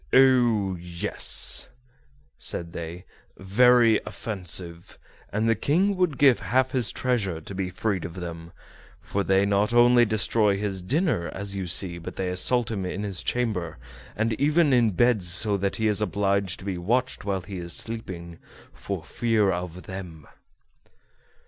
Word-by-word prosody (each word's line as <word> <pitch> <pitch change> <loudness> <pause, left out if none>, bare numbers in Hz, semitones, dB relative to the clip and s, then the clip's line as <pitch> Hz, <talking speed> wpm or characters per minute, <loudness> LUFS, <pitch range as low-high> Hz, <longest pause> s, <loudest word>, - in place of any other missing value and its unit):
"Oh! 120 -7 +4
yes," 85 0 +1 0.7
said 85 -1 -3
they, 85 +2 -7 0.3
"very 115 +3 +4
offensive; 90 -4 -4 0.3
and 110 +2 0
the 115 - +4
King 175 - +1
would 180 -7 0
give 135 -4 +5
half 130 +1 +1
his 125 -4 +1
treasure 105 -10 -1
to 80 - -8
be 95 -1 -3
freed 95 0 -2
of 85 - -7
them, 85 -2 -7 0.5
for 100 - -3
they 95 +1 +2
not 100 +3 +1
only 120 0 +6
destroy 105 -1 +1
his 100 -2 -3
dinner, 135 - 0
as 100 0 -5
you 95 -2 -4
see, 85 0 +1
but 85 - -8
they 95 -1 -2
assault 115 +6 +2
him 100 -4 -3
in 90 +2 -4
his 100 -3 -3
chamber, 105 -10 -2 0.4
and 110 +1 0
even 150 0 +3
in 120 -3 +4
bed, 120 +2 +2
so 90 +4 +2
that 100 0 -1
he 110 - 0
is 105 0 +1
obliged 100 -2 0
to 95 - -12
be 95 -3 -3
watched 125 +8 -1
while 100 -2 -2
he 95 +1 -8
is 85 0 -6
sleeping, 90 -7 -4 0.3
for 95 -5 -6
fear 110 +1 +1
of 90 0 -5
them." 90 -6 -9
100 Hz, 155 wpm, -25 LUFS, 90-120 Hz, 0.7 s, only